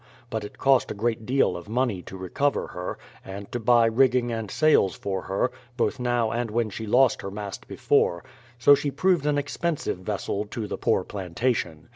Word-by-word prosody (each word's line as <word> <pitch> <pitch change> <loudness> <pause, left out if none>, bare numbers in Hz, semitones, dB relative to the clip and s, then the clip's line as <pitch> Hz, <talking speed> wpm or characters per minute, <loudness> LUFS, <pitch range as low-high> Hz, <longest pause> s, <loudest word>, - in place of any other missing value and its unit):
But 110 -1 -2
it 105 - -9
cost 135 -2 +3
a - - -4
great 110 +1 -2
deal 135 +2 +2
of 85 +4 -8
money 115 -5 0
to 95 - -10
recover 135 +10 -1
her, 90 0 -5 0.3
and 100 +1 -8
to 120 - -2
buy 120 0 +4
rigging 120 +1 +3
and 115 -3 -3
sails 155 -10 +3
for 95 -2 -3
her, 100 +7 -1 0.3
both 130 +2 0
now 120 -2 +1
and 120 0 -2
when 110 0 -1
she 110 +3 -6
lost 130 +3 +4
her 100 - -5
mast 100 0 -7
before; 85 0 +1 0.3
so 130 +4 +7
she 140 +1 +1
proved 160 +2 +1
an 145 -1 +2
expensive 145 - -2
vessel 100 +1 -3
to 110 +1 -5
the - - -4
poor - - +2
plantation. 90 -3 -2
115 Hz, 190 wpm, -25 LUFS, 100-130 Hz, 0.3 s, so